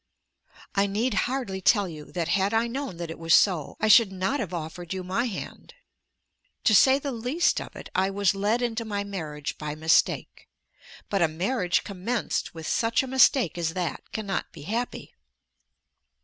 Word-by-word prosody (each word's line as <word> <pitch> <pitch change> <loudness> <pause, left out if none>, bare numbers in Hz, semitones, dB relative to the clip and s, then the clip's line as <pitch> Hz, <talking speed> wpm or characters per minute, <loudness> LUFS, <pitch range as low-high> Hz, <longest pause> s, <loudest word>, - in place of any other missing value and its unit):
I 200 0 +2
need 220 +5 0 0.2
hardly 245 -8 -3
tell 205 0 +4
you 155 -3 -9
that 170 -2 -2
had 195 +3 +1
I 225 +1 +3
known 255 -5 -4
that 170 -1 -5
it 165 - -9
was 165 0 +4
so 175 -8 +2
I 215 - +1
should 215 -1 +7
not 190 +9 -1
have 205 -9 -3
offered 175 +1 -5
you 185 - -4
my 185 +6 -1
hand. 240 - -7 0.9
To 220 - +4
say 265 +6 +6
the 280 0 -4
least 250 +8 0
of - - -10
it, - - -9
I 190 +1 +2
was 195 -2 +2
led 210 +5 0
into 230 -1 -1
my 205 -2 -3
marriage 155 -7 -5
by 150 -1 -4
mistake. 160 +1 +1 0.6
But 200 -2 +1
a 170 - +5
marriage 180 +3 0
commenced 200 +1 -3
with 160 -1 -7
such 230 +7 +1
a - - -5
mistake 260 - +3
as 165 -1 -2
that 180 -2 -4
cannot 205 -3 -3
be 150 - -11
happy. 230 +9 -4
195 Hz, 175 wpm, -26 LUFS, 175-230 Hz, 0.9 s, should